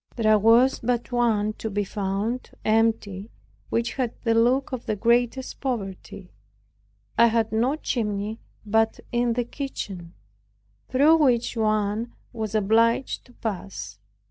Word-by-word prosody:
There 215 Hz, -2 st, +4 dB
was 230 Hz, +5 st, +5 dB
but 240 Hz, +1 st, -1 dB
one 220 Hz, -3 st, +1 dB
to 220 Hz, -, -3 dB
be 205 Hz, 0 st, -1 dB
found 200 Hz, +5 st, -3 dB, 0.2 s
empty 215 Hz, -2 st, +1 dB, 0.4 s
which 235 Hz, +1 st, -1 dB
had 250 Hz, -3 st, -1 dB
the 230 Hz, -1 st, +2 dB
look 245 Hz, +4 st, +2 dB
of 255 Hz, -2 st, -5 dB
the 215 Hz, -, 0 dB
greatest 240 Hz, +4 st, 0 dB
poverty. 200 Hz, -6 st, -5 dB, 0.9 s
It 235 Hz, 0 st, +7 dB
had 225 Hz, -1 st, +1 dB
no 240 Hz, +6 st, +1 dB
chimney 215 Hz, -6 st, -2 dB, 0.3 s
but 220 Hz, +1 st, +1 dB
in 240 Hz, 0 st, +1 dB
the 245 Hz, +1 st, 0 dB
kitchen, 195 Hz, -, -6 dB, 0.7 s
through 290 Hz, +5 st, +5 dB
which 245 Hz, -6 st, +2 dB
one 215 Hz, +1 st, 0 dB, 0.2 s
was 220 Hz, -2 st, -4 dB
obliged 225 Hz, +4 st, +2 dB
to 245 Hz, -, -19 dB
pass. 185 Hz, -, -6 dB
225 Hz, 130 wpm, -25 LUFS, 210-240 Hz, 0.9 s, It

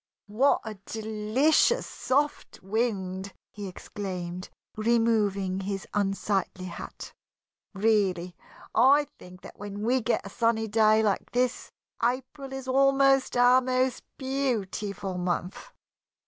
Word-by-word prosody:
"What 235 Hz, +7 st, +2 dB
a 215 Hz, -3 st, -7 dB
delicious 220 Hz, +7 st, +2 dB
soft 285 Hz, -4 st, -2 dB
wind!" 195 Hz, -3 st, -2 dB, 0.2 s
he 205 Hz, -2 st, -7 dB
exclaimed, 185 Hz, -1 st, -6 dB, 0.3 s
removing 215 Hz, -4 st, +1 dB
his 195 Hz, 0 st, -4 dB
unsightly 195 Hz, -2 st, -1 dB
hat. 185 Hz, -, -8 dB, 0.6 s
"Really, 195 Hz, -4 st, +1 dB, 0.4 s
I 275 Hz, +6 st, +5 dB
think 180 Hz, +1 st, -13 dB
that -, -, -13 dB
when 205 Hz, 0 st, -6 dB
we 250 Hz, +3 st, +2 dB
get 235 Hz, -2 st, 0 dB
a -, -, -6 dB
sunny 230 Hz, -1 st, +1 dB
day 215 Hz, 0 st, +4 dB
like 205 Hz, -2 st, 0 dB
this, 250 Hz, 0 st, 0 dB, 0.3 s
April 265 Hz, +3 st, -2 dB
is 270 Hz, -1 st, -6 dB
almost 270 Hz, 0 st, +3 dB
our 250 Hz, +1 st, +6 dB
most 255 Hz, 0 st, 0 dB, 0.2 s
beautiful 210 Hz, -8 st, -2 dB
month." 180 Hz, -, -3 dB
220 Hz, 110 wpm, -27 LUFS, 195-255 Hz, 0.6 s, our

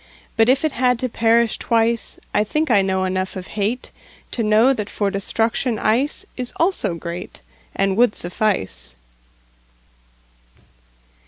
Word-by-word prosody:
But 225 Hz, +1 st, +4 dB
if 275 Hz, +4 st, +3 dB
it 310 Hz, -, +1 dB
had 250 Hz, -1 st, +2 dB
to 255 Hz, +2 st, -2 dB
perish 230 Hz, 0 st, +2 dB
twice,I 230 Hz, -2 st, 0 dB
think 305 Hz, +6 st, -1 dB
I 205 Hz, -3 st, +5 dB
know 190 Hz, -1 st, 0 dB
enough 185 Hz, 0 st, -2 dB
of 185 Hz, -1 st, -7 dB
hateTo 225 Hz, +2 st, -5 dB
know 220 Hz, +5 st, +4 dB
that 210 Hz, -5 st, -4 dB
for 200 Hz, -2 st, -1 dB
destruction 225 Hz, +4 st, 0 dB
iceIs 255 Hz, -, -1 dB
also 330 Hz, -, 0 dB
greatAnd 170 Hz, -, -5 dB
would 235 Hz, 0 st, +3 dB
suffice. 95 Hz, -, -2 dB
220 Hz, 115 wpm, -21 LUFS, 190-245 Hz, -, I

